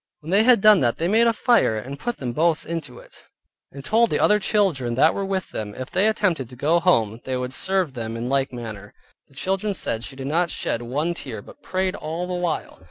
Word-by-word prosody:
When 155 +3 -7
they 200 +3 +5
had 235 -2 +5
done 215 -2 +7
that 120 -4 +1
they 165 - 0
made 225 +4 +4
a - - +5
fire 230 - +2
and 135 +6 -7
put 240 +5 -3
them 125 -3 -4
both 160 +3 +1
into 155 -6 -5
it, - - -15 0.5
and 140 -1 -10
told 230 +1 +3
the - - 0
other 210 0 +4
children 175 - 0
that 150 +5 +4
were 200 - -3
with 195 -1 -3
them 105 -1 -5
that - - -8
if 130 - -7
they 190 +4 +3
attempted 185 - 0
to 125 - -11
go 155 +7 +2
home, 115 - +1
they 130 -1 -2
would 125 0 -4
serve 190 -2 0
them 115 -2 -5
in 120 +1 -4
like 135 +1 0
manner. 110 -5 -8 0.3
The 140 - -24
children 195 +6 -1
said 115 -9 -3
she 135 - -7
did 135 0 -7
not 165 +5 +1
shed 115 - -2
one 145 +8 -2
tear, 115 -11 -7
but - - -15
prayed 185 0 -1
all 165 +3 -4
the 180 - -4
while. 175 -2 -3
160 Hz, 240 wpm, -23 LUFS, 125-190 Hz, 0.5 s, done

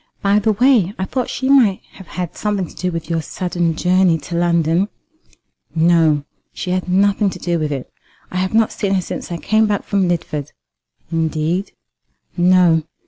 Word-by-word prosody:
By 200 +1 +4
the 215 +1 +1
way, 225 -4 +3
I 190 - -2
thought 250 +4 -2
that - - -11
she 260 - -3
might 245 -9 +4
have 190 - -14
had 180 -1 -5
something 205 -3 -1
to - - -15
do 180 0 -2
with 165 -1 -5
your 165 -1 -1
sudden 175 0 -2
journey 180 0 +3
to 160 +3 -7
London." 170 +1 +2 0.9
"No; 160 -3 +3 0.3
she 180 - -5
had 185 0 -1
nothing 200 +2 +3
to - - -7
do 170 -1 -1
with 155 -1 -2
it. 135 -3 -5 0.4
I 185 - -3
have 185 +3 -1
not 225 -1 +3
seen 195 -2 -1
her 185 - +1
since 175 - -6
I 170 - -2
came 215 +5 +2
back 205 -1 -1
from 195 -2 0
Lidford." 150 -4 -3 0.6
"Indeed!" 165 +3 -1 0.6
"No. 175 -2 +4
180 Hz, 185 wpm, -18 LUFS, 165-200 Hz, 0.9 s, By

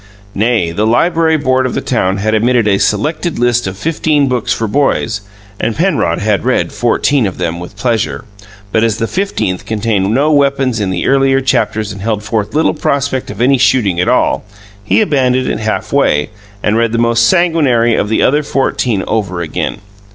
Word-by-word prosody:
Nay, 105 -5 +1
the 105 +6 0
Library 160 +6 +2
Board 130 -3 +1
of 125 - -5
the - - 0
town 95 -6 -1
had 110 +2 -1
emitted 115 +1 +2
a 100 -1 +2
"Selected 155 - -1
List 120 -2 +1
of 95 0 -5
Fifteen 150 +2 0
Books 125 -3 -1
for 115 - -1
Boys," 115 -4 0 0.4
and 115 - -1
Penrod 160 - 0
had 105 -1 0
read 130 +1 0
fourteen 120 +1 +1
of 95 - -6
them 85 -1 -3
with 90 +4 -10
pleasure, 115 +2 -1 0.5
but 110 +1 +2
as 115 -2 +1
the 115 - -1
fifteenth 150 - -2
contained 105 -3 0
no 140 +6 +2
weapons 140 -4 +1
in 100 -2 -1
the 90 -2 -2
earlier 135 0 +3
chapters 110 -5 0
and 100 -1 -8
held 105 0 -2
forth 105 +1 -3
little 160 - +2
prospect 140 -2 -1
of - - -6
any 135 +1 +3
shooting 105 -9 +2
at 90 - +1
all, 125 - +1 0.4
he 105 - +2
abandoned 130 -8 +1
it - - -2
halfway, 110 -7 0 0.3
and 105 +2 +1
read 115 -1 +1
the - - 0
most 115 0 +3
sanguinary 140 -10 +2
of 105 - 0
the 110 - +1
other 145 +3 +3
fourteen 125 -7 -1
over 95 -5 -2
again. 85 +4 -4
115 Hz, 185 wpm, -13 LUFS, 105-135 Hz, 0.5 s, earlier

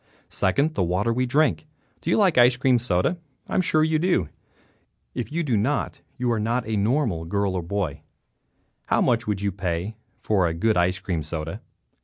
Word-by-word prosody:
Second, 140 +12 +1
the - - -1
water 90 +6 +1
we 125 +2 0
drink. 150 +3 +1 0.3
Do - - -4
you - - +3
like 195 -6 +4
ice 125 0 +5
cream 130 -1 +3
soda? 115 - 0 0.3
I - - -7
am - - +3
sure 155 -3 +2
you 155 0 +2
do. 170 - +1 0.8
If 125 - -4
you 170 +2 -1
do 130 -7 0
not 125 +8 -1 0.2
you 125 -1 0
are 115 - 0
not 115 +3 -1
a 110 - -1
normal 105 - +1
girl 100 +3 -1
or 90 - -1
boy. 85 -4 -3 0.9
How - - +2
much 115 -1 +2
do - - -4
you 100 +1 -1
have 95 - -18
to - - -18
pay 90 +4 -2 0.3
for 95 -5 +2
a 80 - -2
good 110 +6 +1
ice 90 +1 +2
cream 90 -4 -3
soda? 80 +1 -5
110 Hz, 205 wpm, -24 LUFS, 90-130 Hz, 0.9 s, ice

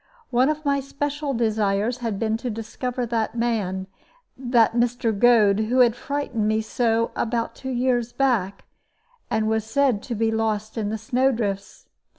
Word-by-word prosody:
One 255 +3 +3
of 305 0 -3
my 280 -1 +2
special 280 +1 -3
desires 215 0 0
had 225 -4 -2
been 220 +1 0
to 245 +2 -4
discover 240 +3 -4
that 230 -1 -2
man, 205 -6 -1 0.5
that 240 -3 +2
Mr. 240 -1 +1
Goad, 210 -2 +5
who 250 +3 +3
had 240 -2 +4
frightened 260 -6 -2
me 215 0 +1
so 230 +1 0
about 230 0 -1
two 265 - -7
years 245 -2 0
back, 225 -9 0 0.6
and 220 0 0
was 220 0 +1
said 250 -2 +1
to 240 - -5
be 225 +1 +1
lost 220 -1 -1
in 215 -3 -2
the 220 - -2
snow 250 +5 +1
drifts. 200 -5 -4
230 Hz, 160 wpm, -23 LUFS, 220-250 Hz, 0.6 s, Goad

